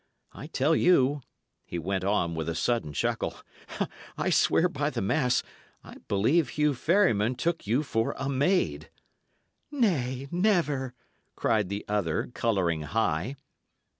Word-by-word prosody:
I 145 - -9
tell 155 +1 +1
you," 145 -5 +3 0.4
he 85 - -6
went 95 +3 -2
on, 95 -4 +1
with 80 0 -3
a 85 - -2
sudden 115 -4 0
chuckle, 75 - -1 0.8
"I - - 0
swear - - +4
by - - -2
the - - -4
mass 125 +5 +1 0.4
I - - -12
believe 125 +9 +2
Hugh 150 +1 +1
Ferryman 130 - +2
took 165 -3 -2
you 125 +8 +2
for 115 -5 -1
a 135 - -3
maid." 145 +8 +1 0.8
"Nay, 140 - 0
never!" 165 - +1 0.4
cried 105 -4 +1
the 100 +1 -4
other, 100 -2 -1
colouring 90 -8 0
high. 100 - -1
125 Hz, 135 wpm, -28 LUFS, 100-150 Hz, 0.8 s, swear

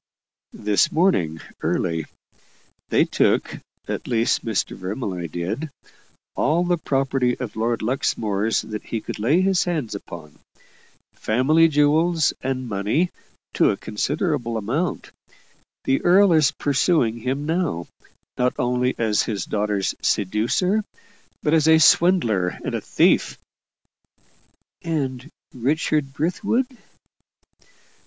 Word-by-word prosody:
"This 105 -1 +2
morning, 120 - +1 0.2
early. 80 -2 -1 0.8
They - - +3
took - - +1 0.3
at - - -4
least, 115 -2 +1
Mr. 110 -4 -2
Vermilye 95 -3 -4
did 105 - -3 0.6
all 160 +5 +1
the 175 -1 0
property 135 -4 0
of 125 -5 -5
Lord 115 +1 -1
Luxmore's 110 -3 0
that 105 -1 -6
he 115 - -3
could 105 - -7
lay 140 - +3
his 190 -1 +2
hands 155 -10 -2
upon 85 -6 -10 0.7
family 150 +9 +3
jewels 155 +2 +2
and 130 -1 -3
money 110 - 0 0.4
to - - +3
a - - 0
considerable 135 - -2
amount. 130 - -2 0.7
The 135 - +1
earl 190 +1 +5
is 155 -4 +4
pursuing 140 -4 +1
him 135 +5 -2
now, 160 - -1 0.5
not 125 0 +1
only 125 +1 0
as 110 -2 +1
his 100 -5 -3
daughter's 105 -2 -1
seducer, 115 - +1 0.6
but 150 - +1
as 160 -1 +3
a 160 0 +7
swindler 160 - +4 0.2
and - - -3
a - - -2
thief." - - +2 1.4
"And 140 -4 -3 0.2
Richard 140 +2 0
Brithwood?" 225 - -1
130 Hz, 115 wpm, -22 LUFS, 110-160 Hz, 1.4 s, a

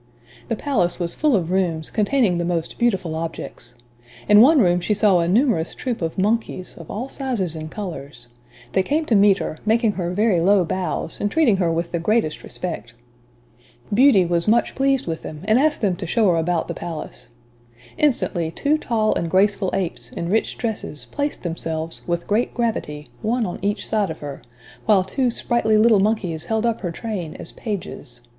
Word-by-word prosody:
The - - -1
palace 185 -12 0
was 170 -1 -1
full 300 -4 +2
of 175 -3 -1
rooms, 170 -4 0
containing 215 -4 +2
the - - 0
most 170 -1 -2
beautiful 195 -9 +1
objects. 160 -6 -6 0.5
In 210 +1 +8
one 300 +6 +7
room 180 -5 +4
she 210 +4 0
saw 200 -3 +4
a 170 - +1
numerous 210 - +2
troupe 245 -6 -3
of 165 +2 -3
monkeys, 200 -2 -1
of 165 - -12
all 235 +6 -4
sizes 240 - -3
and 155 0 -6
colors. 145 - -7 0.4
They 190 - +2
came 300 +11 0
to 235 - +2
meet 200 -1 +5
her, 155 - -5
making 225 +1 +2
her 180 -4 -3
very 200 0 +2
low 190 +1 +4
bows, 180 -1 -3
and 205 - +1
treating 260 -7 +3
her 175 -3 +1
with 170 +1 -2
the 170 - -1
greatest 190 -3 0
respect. 120 -10 -6 1.0
Beauty 230 -5 +5
was 170 +1 0
much 230 +2 +3
pleased 270 -1 +1
with 165 -1 -4
them, 155 -1 -8
and 220 +3 +3
asked 305 +2 +2
them 195 -5 +1
to - - -5
show 215 +2 +3
her 170 - +1
about 165 0 0
the - - -3
palace. 160 -3 -7 0.7
Instantly, 205 - +1
two 285 - 0
tall 220 -5 +1
and 170 - -2
graceful 195 +1 +2
apes, 180 -3 -3
in 170 - -4
rich 220 +4 0
dresses, 220 -10 -4
placed 290 0 -3
themselves, 165 -1 -3
with 170 0 -1
great 215 +4 0
gravity, 180 -11 -2 0.2
one 230 +2 0
on 175 - -5
each 205 +2 -1
side 210 -4 0
of 160 - -5
her, 145 -2 -7 0.5
while 205 -4 +5
two 250 +7 0
sprightly 230 -2 +1
little 220 -1 +5
monkeys 195 -6 0
held 220 0 0
up 230 -1 0
her 180 - -2
train 180 -3 -5
as - - -9
pages. 175 - -6
195 Hz, 190 wpm, -22 LUFS, 170-225 Hz, 1.0 s, In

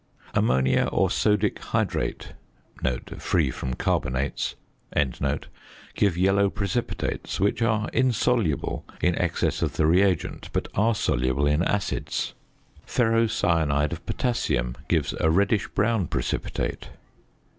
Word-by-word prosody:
Ammonia 65 +1 +2
or - - +2
sodic 105 -2 +2
hydrate - - -2 0.9
(free 75 -7 +1
from 65 0 -4
carbonates) 65 +3 -1 1.4
give 100 -5 +1
yellow 100 +2 +3
precipitates, 105 +4 -3
which 100 +5 +1
are 110 -1 +1
insoluble 120 - +1 0.2
in 90 - +2
excess 90 -1 0
of - - 0
the 75 - +3
reagent, 90 +1 +2
but - - -1
are 110 +3 +2
soluble 70 - +1
in 75 +2 +2
acids. 100 +2 -1 0.5
Ferrocyanide 90 - +2
of 85 0 -7
potassium 65 - 0
gives 80 -4 +1
a 80 - +3
reddish 100 +4 +2
brown 105 -3 +1
precipitate. - - -3
95 Hz, 105 wpm, -25 LUFS, 75-110 Hz, 1.4 s, yellow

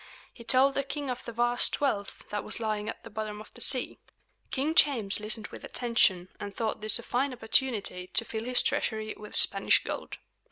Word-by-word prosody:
He 235 - -13
told 265 +3 +4
the 275 - 0
king 280 -1 -4
of 250 - -6
the - - -6
vast 240 +1 +1
wealth 210 -9 -2
that 210 0 -3
was 215 - -3
lying 215 -1 -2
at - - -8
the 230 - -10
bottom 215 -1 -5
of 215 - -13
the - - -13
sea. 255 -2 -1 0.5
King 285 +4 -1
James 250 - +4
listened 215 0 -2
with - - -11
attention, 195 -7 +1
and 205 -1 -7
thought 225 -2 -3
this 215 0 +8
a 235 - -8
fine 265 +4 -1
opportunity 225 -6 0
to 230 - 0
fill 220 0 -5
his 250 0 +3
treasury 220 -1 -1
with 210 0 -7
Spanish - - +4
gold. - - -6
225 Hz, 200 wpm, -28 LUFS, 210-255 Hz, 0.5 s, this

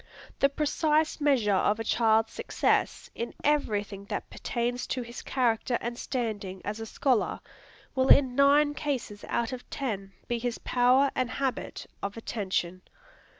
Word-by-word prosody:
The 275 - +5
precise 305 +2 +1
measure 255 -8 +3
of 205 +3 +2
a - - -1
child's 225 0 +2
success, - - 0
in 235 - -5
every 280 -9 +2
thing 200 -1 -10
that - - -5
pertains 245 +1 -2
to 255 - -2
his 235 0 -8
character 240 -1 +1
and 240 0 -4
standing 215 -7 -3
as 210 +2 -3
a 225 - -5
scholar, 250 0 +1 0.5
will 260 -1 +2
in 265 -3 +6
nine 285 +2 +5
cases 260 -9 -3
out 235 +1 -1
of 250 - -8
ten 200 -7 -4
be 240 -1 -1
his 240 0 -2
power 255 +3 +3
and 255 -1 0
habit 265 0 -3 0.2
of 200 +2 -4
attention. 185 -5 -2
240 Hz, 150 wpm, -28 LUFS, 215-270 Hz, 0.5 s, in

